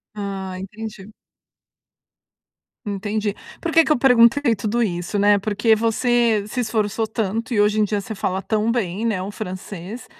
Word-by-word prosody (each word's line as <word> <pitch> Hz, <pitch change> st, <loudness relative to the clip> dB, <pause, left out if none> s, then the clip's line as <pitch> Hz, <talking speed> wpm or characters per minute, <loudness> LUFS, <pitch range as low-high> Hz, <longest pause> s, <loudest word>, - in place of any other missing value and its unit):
Ah, 195 Hz, -2 st, -5 dB
entendi. 210 Hz, +1 st, -8 dB, 1.7 s
Entendi. 205 Hz, +1 st, -2 dB, 0.3 s
Por 335 Hz, -, -2 dB
que 325 Hz, 0 st, +5 dB
que -, -, 0 dB
eu -, -, 0 dB
perguntei 245 Hz, 0 st, +5 dB
tudo 220 Hz, +4 st, 0 dB
isso, 175 Hz, +1 st, -2 dB
né? 205 Hz, 0 st, +4 dB
Porque 215 Hz, +2 st, +2 dB
você 230 Hz, -1 st, +2 dB
se 250 Hz, -, -4 dB
esforçou 220 Hz, -1 st, -1 dB
tanto, 225 Hz, +2 st, -2 dB
e 205 Hz, -, +3 dB
hoje 210 Hz, +1 st, +2 dB
em 210 Hz, -, +4 dB
dia 205 Hz, 0 st, -1 dB
você 220 Hz, -, -6 dB
fala 190 Hz, -3 st, -2 dB
tão 215 Hz, +3 st, 0 dB
bem, 220 Hz, -2 st, -1 dB
né, 205 Hz, -5 st, 0 dB
o 195 Hz, +2 st, -5 dB
francês. 195 Hz, +2 st, -7 dB
215 Hz, 160 wpm, -21 LUFS, 200-230 Hz, 1.7 s, que